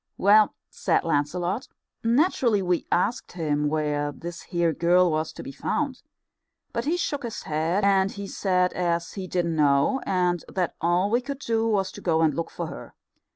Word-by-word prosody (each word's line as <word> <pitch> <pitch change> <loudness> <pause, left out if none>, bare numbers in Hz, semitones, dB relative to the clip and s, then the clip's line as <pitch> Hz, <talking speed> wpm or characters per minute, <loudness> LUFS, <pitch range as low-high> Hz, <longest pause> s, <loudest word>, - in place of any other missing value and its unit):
"Well," 210 +1 +5 0.2
said - - +1
Lancelot, 175 - -1 0.4
"naturally 235 - +2
we 180 -1 0
asked 225 +8 0
him 150 -4 0
where 150 -1 -1
this 170 +5 -8
here 170 -2 0
girl 175 +2 +3
was 155 0 -1
to - - -8
be - - -7
found. 265 - -2 0.7
But - - -2
he 330 +4 +1
shook 290 -5 -2
his 235 -4 -5
head, 160 +6 0
and 195 -1 +3
he 200 0 -6
said 180 -2 +1
as 170 -1 -1
he 190 -2 -5
didn't 175 -2 -1
know, 145 - +3
and 180 -2 +1
that 180 -2 -1
all 175 +4 +2
we 240 +2 +3
could 275 +2 -5
do 230 -4 0
was 195 -4 +1
to - - -10
go 165 -2 +2
and 155 -2 +3
look 165 +3 -3
for - - -5
her. - - -9
180 Hz, 180 wpm, -25 LUFS, 165-210 Hz, 0.7 s, Well